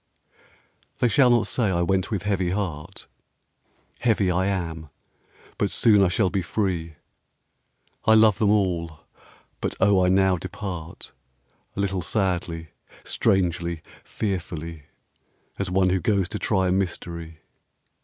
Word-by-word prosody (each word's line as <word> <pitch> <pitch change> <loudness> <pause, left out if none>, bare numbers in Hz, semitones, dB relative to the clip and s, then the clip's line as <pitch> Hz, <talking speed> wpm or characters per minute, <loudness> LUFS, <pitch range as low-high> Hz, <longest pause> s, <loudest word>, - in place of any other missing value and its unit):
They 125 - +2
shall 125 +2 +4
not 120 -2 +3
say 120 - 0
I 85 -2 +1
went 95 +1 0
with 100 -4 -2
heavy 95 -3 0
heart: 90 -6 -4 0.9
Heavy 110 -6 +2
I 90 +2 +1
am, 80 -5 -3 0.7
but - - +1
soon 105 -3 +4
I 95 - +5
shall 90 +1 +1
be 95 - 0
free; 85 -3 -2 1.1
I 110 - +6
love 110 -3 +5
them 105 - +3
all, 85 -6 0 0.6
but - - -2
O 95 -2 +4
I 90 - +3
now 95 0 +3
depart 90 -2 -7 0.6
A - - -5
little 95 -2 0
sadly, 85 -4 -2 0.3
strangely, 85 -3 0 0.2
fearfully, 85 -6 -4 0.7
As 100 -2 -1
one 95 0 +2
who 95 - +1
goes 100 -3 +1
to 105 - -4
try 95 -3 +1
a - - +1
Mystery. 85 -3 -3
95 Hz, 135 wpm, -24 LUFS, 85-100 Hz, 1.1 s, I